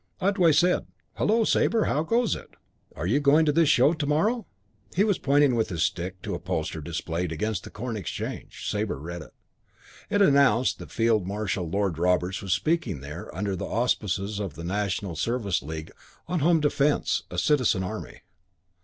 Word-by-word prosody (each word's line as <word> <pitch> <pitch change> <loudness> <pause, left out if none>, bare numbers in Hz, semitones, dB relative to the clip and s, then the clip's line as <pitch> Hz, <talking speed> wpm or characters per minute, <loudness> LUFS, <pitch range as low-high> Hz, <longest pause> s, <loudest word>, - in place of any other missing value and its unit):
Otway 190 -3 +3
said, 180 +4 +3 0.3
"Hullo, 225 +2 +3
Sabre. 225 0 +2
How 150 - +1
goes 230 +8 +1
it? - - -12 0.4
Are 75 - -4
you 115 +11 +2
going 150 +2 +4
to 150 - +3
this 160 0 +3
show 150 - +5
to 155 -3 -3
morrow?" 210 +10 +1 0.5
He 195 - +4
was 205 -3 +1
pointing 145 -1 +3
with 115 -2 0
his 85 -3 -1
stick 90 +1 -3
to - - -3
a - - -3
poster 80 0 -3
displayed 85 +2 -3
against 100 +4 -2
the - - -8
Corn 115 +2 -5
Exchange. 95 -9 -6
Sabre - - -1
read 85 +3 -6
it. 75 - -14 0.7
It 205 - +1
announced 140 - +4
that - - -9
Field 115 -5 +1
Marshal 100 -4 -2
Lord 95 -3 -1
Roberts 90 +2 +1
was 95 - -4
speaking 120 - 0
there, 75 +5 -8
under 100 0 -1
the - - -4
auspices 105 -3 -1
of 95 -8 -4
the 85 - -8
National 95 -1 -2
Service 100 +1 -1
League, 80 +3 -7 0.4
on 180 0 -1
Home 165 +2 +3
Defence 145 0 +1
a - - -7
Citizen 125 -10 +2
Army. 90 - -6
110 Hz, 180 wpm, -26 LUFS, 90-150 Hz, 0.7 s, show